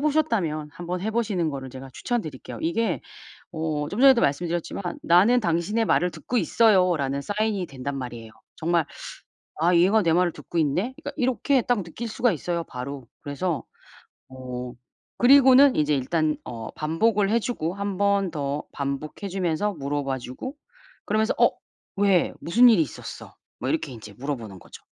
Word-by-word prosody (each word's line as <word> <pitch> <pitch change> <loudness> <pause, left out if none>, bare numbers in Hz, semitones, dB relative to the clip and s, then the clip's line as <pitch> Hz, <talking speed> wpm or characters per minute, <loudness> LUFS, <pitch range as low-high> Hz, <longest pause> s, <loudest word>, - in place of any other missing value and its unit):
보셨다면 230 - 0
한번 175 +1 -5
해 215 +4 -2
보시는 210 -7 0
거를 135 -2 -6
제가 135 +1 -9
추천드릴게요. 155 - -4
이게 175 +4 0 0.5
어 155 -3 -2
좀 205 - -4
전에도 265 -3 +7
말씀드렸지만 170 +6 -1 0.2
"나는 195 +9 +5
당신의 170 +5 0
말을 180 -3 +2
듣고 250 - -3
있어요."라는 180 - +3
사인이 205 +1 -1
된단 140 +1 -5
말이에요. 120 -3 -7 0.3
정말 170 -1 +1 0.7
'아 175 +3 +3
얘가 190 +6 +5
내 165 - +2
말을 175 0 +3
듣고 - - -7
있네.' 180 - 0
그러니까 285 - -4
이렇게 260 0 +2
딱 235 -3 0
느낄 175 +8 -6
수가 235 +2 +2
있어요 170 0 -2
바로. 130 +1 -7 0.2
그래서 145 -1 -2 0.7
어 125 -1 -7 0.4
그리고는 265 +1 +7
이제 150 -1 +2
일단 155 +3 0
어 115 -2 -6
반복을 195 +7 +1
해 230 +2 +3
주고 185 -8 -3
1 200 -1 -3
번 200 -2 +2
더 145 0 -3
반복해 140 +7 -4
주면서 185 +2 -1
물어봐 140 -2 -2
주고 130 - -7 0.5
그러면서 215 +2 +1
"어 - - +6 0.5
왜? 195 -4 +3
무슨 240 +9 +6
일이 215 -8 +5
있었어?" - - -7 0.2
뭐 - - -2
이렇게 300 - -1
인제 110 -3 -11
물어보는 120 -9 -5
거죠. - - -14
170 Hz, 340 characters per minute, -25 LUFS, 140-215 Hz, 0.7 s, 전에도